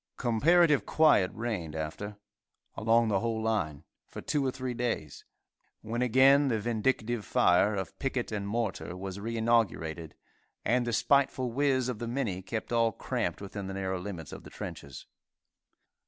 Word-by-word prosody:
Comparative 150 +6 +4
quiet 150 -12 +4
reigned 105 -9 -4
after, 90 +7 -5 0.6
along 115 +1 +3
the 100 -3 +2
whole 115 0 -1
line, 90 -11 -1 0.2
for - - -9
two 145 -2 -1
or 135 - +1
three 130 -1 -4
days, 115 - -3 0.6
when 115 +2 -3
again 135 +3 +5
the 115 -4 +1
vindictive 115 0 -1
fire 95 +4 +3
of 95 -1 -5
picket 130 -4 -2
and 100 -2 -3
mortar 100 -4 -3
was 95 +1 -6
re 115 +3 -4
inaugurated, 90 -9 0 0.5
and 120 +1 +2
the - - 0
spiteful 130 +1 +2
whiz 130 -1 +1
of 125 -4 -3
the 120 - -4
minnie 115 -7 -2
kept 110 +5 -5
all 115 -1 +3
cramped - - -3
within 100 0 -6
the 95 - -5
narrow 95 -1 -2
limits 90 -5 -7
of - - -9
the - - -11
trenches. 70 -2 -8
115 Hz, 155 wpm, -29 LUFS, 95-125 Hz, 0.6 s, again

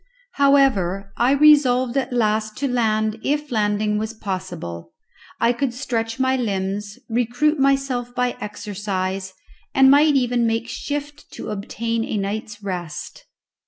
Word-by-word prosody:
However, 220 - +2
I 245 +3 +3
resolved 275 -4 +5
at 270 -2 0
last 215 -2 0
to 280 - -1
land 220 -3 0
if 295 0 -1
landing 210 -1 +1
was 220 +1 -4
possible. 180 - -6 0.5
I 235 +1 +3
could 245 -1 -2
stretch 230 -2 -3
my 260 0 +2
limbs, 205 -3 -2
recruit 245 +6 +1
myself 270 -3 +1
by 250 0 0
exercise, 195 -2 -4 0.4
and 265 0 +7
might 295 +1 +5
even 245 -3 +2
make 225 +1 -1
shift 290 +2 -5
to - - -6
obtain 225 +3 -2
a 220 - -3
night's 210 +1 -4
rest. 180 -5 -6
230 Hz, 130 wpm, -22 LUFS, 205-265 Hz, 0.5 s, and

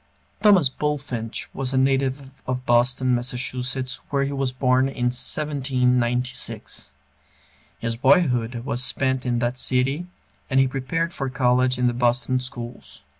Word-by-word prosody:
Thomas 195 -9 +5
Bulfinch 130 -5 -3
was 135 -1 -3
a - - +2
native 135 0 0 0.2
of 125 0 -3
Boston, 125 +1 +2
Mass., 125 +1 -3
where 140 -1 0
he 140 - -2
was 135 -2 -1
born 130 +1 +2
in 125 -2 -1
1796. 125 -3 +1 0.9
His 115 0 -3
boyhood 125 -3 +2
was 125 -1 +1
spent 130 -1 +2
in 120 -1 0
that 120 +2 -2
city, 135 +8 0 0.4
and 135 -1 +2
he 135 - +4
prepared 150 +6 -2
for 135 -1 -3
college 125 0 +1
in 125 - 0
the 120 - +2
Boston 120 +1 +1
schools. 120 -1 -7
130 Hz, 135 wpm, -23 LUFS, 125-135 Hz, 0.9 s, Thomas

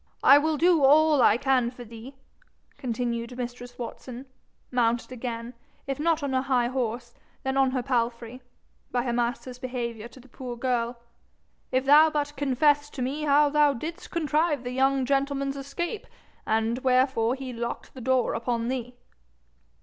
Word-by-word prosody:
'I 280 - +8
will 310 +1 0
do 340 -1 +4
all 300 +1 +5
I 215 -1 +5
can 255 -2 +2
for 245 0 -10
thee,' 230 +4 -11 0.6
continued 240 -2 -3
mistress 245 0 -7
Watson, 250 +1 -7 0.5
mounted 240 -1 +1
again, 235 -1 -5 0.3
if 275 0 -4
not 325 0 +1
on 275 -2 -2
her 260 - +2
high 250 -3 +1
horse 240 -2 -3 0.3
then 265 0 -1
on 270 -1 +4
her 255 -1 -2
palfrey, 240 -1 -2 0.5
by 245 -1 0
her 240 -2 -2
master's 245 +1 -2
behaviour 235 -3 -4
to 240 +2 -16
the 255 - -17
poor 250 -1 -7
girl 240 -1 -1 0.7
'if 260 +1 +1
thou 300 +3 +7
but 295 -1 -2
confess 290 +2 +2
to 265 -3 -5
me 290 +4 -2
how 290 0 +4
thou 295 -1 +4
didst 325 +8 -7
contrive 310 -3 0
the 245 - -4
young 265 +1 +2
gentleman's 275 0 0
escape, 340 +9 -5 0.4
and 225 +2 +1
wherefore 255 -2 +2
he 265 -2 -7
locked 235 0 -5
the 260 - -10
door 260 0 +1
upon 235 0 -2
thee.' 250 -1 -4
255 Hz, 160 wpm, -26 LUFS, 240-280 Hz, 0.7 s, I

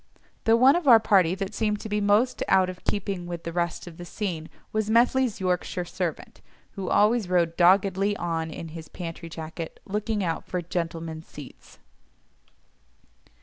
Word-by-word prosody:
The 225 0 +5
one 260 +5 +6
of 345 -4 -1
our 235 -3 +9
party 190 -5 +3
that 195 +1 -4
seemed 210 -1 0
to - - -6
be 210 0 -1
most 210 +5 +2
out 185 -1 +4
of 180 - -15
keeping 195 -3 -2
with 175 -1 -6
the 170 - -5
rest 170 -1 -2
of 170 -2 -11
the 175 - -8
scene 175 -3 -4 0.2
was 215 -1 0
Methley's 240 0 +3
Yorkshire 180 -1 -1
servant, 175 -2 -5 0.3
who 195 -3 -5
always 210 -1 +3
rode 170 -2 +2
doggedly 195 +3 +3
on 165 -2 -2
in 165 +1 -7
his 160 0 -9
pantry 170 -1 -7
jacket, 160 0 -7
looking 210 +1 -2
out 165 -2 -2
for 180 - -3
"gentlemen's 165 -2 -4
seats." 145 -3 -13
185 Hz, 165 wpm, -26 LUFS, 170-210 Hz, 0.3 s, our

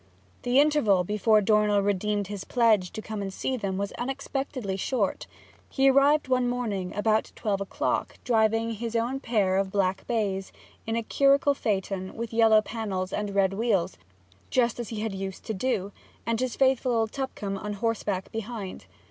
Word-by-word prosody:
The 245 +2 +3
interval 285 -11 +4
before 210 +3 +3
Dornell 210 0 +3
redeemed 205 +1 0
his 200 0 -6
pledge 220 -7 +3
to 220 - -6
come 215 -2 -5
and 195 -1 -4
see 260 +7 -2
them 195 -5 -3
was 200 +1 -2
unexpectedly 265 -4 -3
short. 200 +1 -1 0.4
He 270 0 +4
arrived 280 +2 +4
one 255 -1 +2
morning 210 -7 -2
about 215 +1 +1
twelve 200 -3 -1
o'clock, 200 - -2
driving 225 -1 +2
his 230 +1 -4
own 240 +4 0
pair 205 -7 +1
of 195 -1 0
black 190 -1 0
bays 200 -5 -1 0.4
in 225 - -1
the 230 - -1
curricle 280 +4 +3
phaeton 195 -6 -2
with 230 0 -5
yellow 220 -1 +5
panels 195 -5 -4
and 205 -1 -3
red 195 -1 +3
wheels, 195 -4 0 0.5
just 240 -2 +1
as 235 - -4
he 220 -2 -4
had 220 -2 -2
used 190 -1 -6
to 220 - -2
do, 200 -2 -1 0.3
and 230 -1 0
his 255 -2 -1
faithful 265 -2 +2
old 225 -1 +1
Tupcombe 205 -8 -4
on 210 +1 -4
horseback 205 -3 -2
behind. 225 -3 -6
220 Hz, 170 wpm, -27 LUFS, 195-240 Hz, 0.5 s, yellow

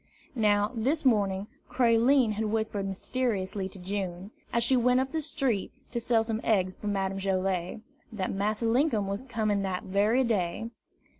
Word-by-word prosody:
Now, 210 -3 +2
this 275 +7 0
morning, 200 -5 +2 0.2
Creline 240 0 +4
had 215 +1 -2
whispered 215 -2 -1
mysteriously 195 -2 -2
to 195 - -9
June, 190 0 -4 0.2
as 235 - +2
she 260 +3 +4
went 250 +1 +3
up 265 0 -1
the 320 - -1
street 275 -9 -1 0.2
to 240 - -1
sell 230 -1 +2
some 225 0 -2
eggs 185 -4 +1
for 210 - -7
Madame 195 -1 -1
Joilet, 190 0 -1 0.3
that 195 -4 -3
Massa 210 +3 -1
Linkum 230 -2 +2
was 200 +1 -3
coming 220 -6 -1
that 190 -2 -2
very 210 +7 +2
day. 220 -1 -1
215 Hz, 160 wpm, -28 LUFS, 195-235 Hz, 0.3 s, Creline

